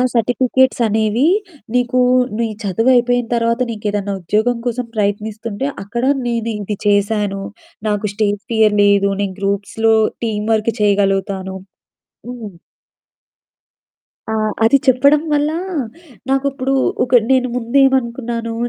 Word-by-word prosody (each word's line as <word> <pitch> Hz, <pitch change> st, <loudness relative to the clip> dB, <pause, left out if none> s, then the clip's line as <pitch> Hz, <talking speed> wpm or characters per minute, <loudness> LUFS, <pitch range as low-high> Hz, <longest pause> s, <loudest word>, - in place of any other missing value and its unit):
Certificates 250 Hz, +2 st, +2 dB
అనేవి 220 Hz, +5 st, +1 dB, 0.5 s
నీకు, 250 Hz, +1 st, +1 dB, 0.4 s
నీ 230 Hz, -, +1 dB, 0.2 s
చదువయిపోయిన 245 Hz, +4 st, +2 dB
తర్వాత, 230 Hz, +1 st, 0 dB
నీకేదన్నా 205 Hz, -2 st, -3 dB
ఉద్యోగం 220 Hz, +7 st, 0 dB
కోసం 245 Hz, 0 st, -2 dB
ప్రయత్నిస్తుంటే, 215 Hz, +4 st, -2 dB, 0.2 s
అక్కడ 235 Hz, +5 st, -4 dB, 0.2 s
నేను 230 Hz, -1 st, -1 dB
ఇది 205 Hz, 0 st, -4 dB
చేశాను. 205 Hz, -1 st, +1 dB, 0.5 s
నాకు 210 Hz, 0 st, -1 dB
స్టేజ్ 205 Hz, -1 st, 0 dB
ఫియర్ 220 Hz, -2 st, +3 dB
లేదు. 200 Hz, 0 st, +3 dB
నేను 195 Hz, -2 st, -3 dB
గ్రూప్స్‌లో 200 Hz, +3 st, 0 dB, 0.3 s
టీమ్ 210 Hz, -1 st, -2 dB
వర్క్ 220 Hz, +1 st, +1 dB
చేయగలుగుతాను" 195 Hz, -2 st, 0 dB, 0.7 s
హ్మ్. 225 Hz, -7 st, -8 dB, 1.8 s
ఆ! -, -, -1 dB, 0.3 s
అది 230 Hz, +5 st, +5 dB
చెప్పడం 280 Hz, +3 st, +4 dB
వల్ల 295 Hz, +1 st, +2 dB, 0.8 s
నాకు 270 Hz, +1 st, +1 dB
ఇప్పుడు 270 Hz, 0 st, -2 dB, 0.3 s
ఒక 250 Hz, 0 st, +5 dB
నేను 255 Hz, -1 st, +3 dB
ముందేమనుకున్నాను, 235 Hz, -2 st, 0 dB
225 Hz, 105 wpm, -17 LUFS, 205-245 Hz, 1.8 s, అది